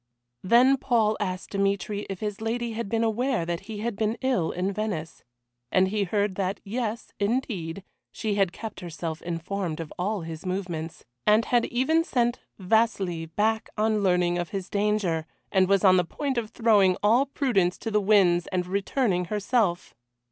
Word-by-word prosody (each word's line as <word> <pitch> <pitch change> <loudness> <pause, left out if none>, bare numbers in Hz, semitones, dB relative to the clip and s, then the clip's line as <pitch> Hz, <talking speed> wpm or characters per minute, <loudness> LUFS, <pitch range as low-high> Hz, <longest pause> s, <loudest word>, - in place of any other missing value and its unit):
Then 250 +7 +5
Paul 225 -5 +2
asked 185 -3 -3
Dmitry 200 +1 -1
if 195 -2 -5
his 210 -1 -4
lady 235 +1 -2
had 225 -2 -4
been 230 +1 +1
aware 230 -3 0
that 170 0 -2
he 210 -2 -5
had 235 -1 -2
been 220 +2 -1
ill 250 -11 +1
in 185 +3 -2
Venice. 195 -6 -4 0.5
And 185 0 +3
he 205 0 0
heard 205 +1 0
that, 195 +1 -1
Yes, 225 +1 -3
indeed, 200 -6 -2 0.3
she 215 -2 -2
had 195 -3 +2
kept 220 +3 -7
herself 165 -2 -5
informed 170 0 -3
of 165 -2 -6
all 200 +2 -1
his 160 -1 -7
movements, 180 -4 -4 0.2
and 215 +2 +5
had 240 -1 +2
even 290 +7 +2
sent 240 -5 0 0.2
Vasili 190 -5 +1
back 215 +6 0
on 215 0 +2
learning 180 -2 +2
of 175 -2 -3
his 195 -2 -5
danger, 200 -6 0 0.2
and 190 -1 +4
was 195 0 +3
on 185 -2 +6
the 180 - +3
point 265 - -2
of 220 -2 -6
throwing 205 -6 +3
all 235 +7 +4
prudence 230 -11 +1
to 225 - -5
the 210 0 +2
winds 190 -4 +4
and 180 -1 -1
returning 195 0 0
herself. 205 -2 0
200 Hz, 170 wpm, -26 LUFS, 180-225 Hz, 0.5 s, on